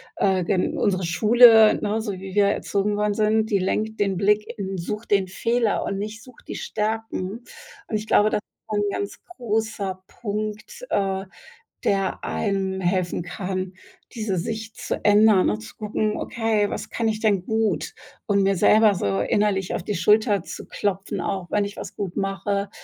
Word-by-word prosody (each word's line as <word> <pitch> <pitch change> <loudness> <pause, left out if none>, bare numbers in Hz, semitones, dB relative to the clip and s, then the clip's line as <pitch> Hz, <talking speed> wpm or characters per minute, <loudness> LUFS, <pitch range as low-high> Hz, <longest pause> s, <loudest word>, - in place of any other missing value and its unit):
äh, 190 -2 +2
gen 180 +1 0
unsere 190 -3 +1
Schule, 220 +4 +6
ne, 215 +1 0
so 215 -2 -3
wie 190 0 -8
wir 205 0 +4
erzogen 205 0 0
worden 210 0 +1
sind, 215 +1 +1
die 200 - +3
lenkt 215 +4 -1
den 195 -2 +1
Blick 210 +2 +3
in 195 -1 -4
sucht 210 +6 -5
den 195 -2 +3
Fehler 230 +4 0
und 195 - -3
nicht 215 +2 -6
sucht 255 -3 -17
die - - -5
Stärken. 220 0 -3 0.4
Und 220 - -3
ich 215 +1 -3
glaube, 215 0 +4
das - - +1
ist - - -66
so - - 0
'n 205 0 +1
ganz 200 0 -4 0.2
großer 215 -5 -2
Punkt, 215 - -5
äh, 195 -1 0 0.6
der 195 -1 0
einem 190 -2 -1
helfen 180 -1 0
kann, 185 +1 -4 0.4
diese 215 -5 -2
Sicht 220 +5 -5
zu - - -3
ändern 210 -2 +5
und 105 +1 -2
zu 110 - -11
gucken: 215 0 -1
„Okay, 225 -4 0
was - - -5
kann 230 -1 -1
ich 215 -1 -2
denn 205 -5 +2
gut?“ 220 -7 0 0.3
und 200 -1 +2
mir 195 0 +2
selber 215 +3 +5
so 100 - -1
innerlich 195 - +1
auf - - -2
die 210 - -3
Schulter 210 +3 +3
zu - - -8
klopfen 195 -1 -2
auch, 185 -3 -3
wenn 205 - +2
ich 200 - -8
was - - -7
gut 190 -4 -5
mache, 200 +1 -1
205 Hz, 180 wpm, -23 LUFS, 190-215 Hz, 0.6 s, Schule